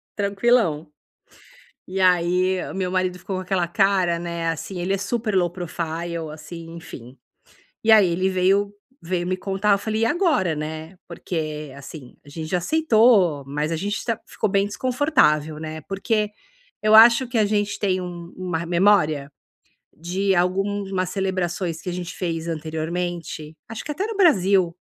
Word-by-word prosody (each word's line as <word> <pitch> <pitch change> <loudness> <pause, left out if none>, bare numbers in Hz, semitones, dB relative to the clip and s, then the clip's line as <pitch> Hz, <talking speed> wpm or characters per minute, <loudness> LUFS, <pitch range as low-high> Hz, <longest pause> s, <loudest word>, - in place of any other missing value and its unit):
Tranquilão. 200 -6 +1 1.0
E 190 +1 -4
aí 180 +1 +3
o - - -8
meu 185 -1 -2
marido 185 -1 0
ficou 195 - -5
com - - -3
aquela 185 -2 0
cara, 185 -2 +2
né. 170 -1 -3
Assim, 175 +3 -4
ele 185 +3 -1
é - - +1
super 215 +1 -2
low 175 -2 +3
profile. 170 -1 -4 0.2
assim. 165 +2 -9
Enfim 135 -7 -11 0.7
E 225 - +4
aí 210 -5 +7
ele 185 +3 +1
veio 195 +2 +2 0.3
veio 175 +1 -2
me 185 0 -1
contar 195 +2 +1
eu - - +3
falei: 220 +2 -2
"E - - +3
agora?", 300 - +1
né. 155 +3 -6
Porque, 155 -4 -5
assim, 140 -2 -11
a 145 - -14
gente 160 +2 -6
já 180 - +1
aceitou, 220 - +3
mas 150 +3 -2
a - - 0
gente 200 +6 -3
tá 230 -2 -2
ficou 215 - -2
bem 200 +1 +2
desconfortável, 210 - +1
né. 155 0 -6
Porque 210 +4 -1 0.5
eu 215 0 +5
acho 235 +3 +8
que 240 -1 -2
a 215 - +4
gente 205 -1 0
tem 185 -2 0
um 175 -1 -8
uma 180 -3 -2
r 170 - -4
memória 170 -6 +2 0.6
de 190 +4 -1
algumas 190 +1 0
celebrações 185 -3 -2
que 180 - -5
a - - -3
gente 175 0 -5
fez 165 -2 -3
anteriormente 160 0 -4
acho 225 - -6
que 300 - -3
até 380 +8 -2
no 450 - -5
Brasil. 195 - +4
185 Hz, 165 wpm, -23 LUFS, 165-200 Hz, 1.0 s, acho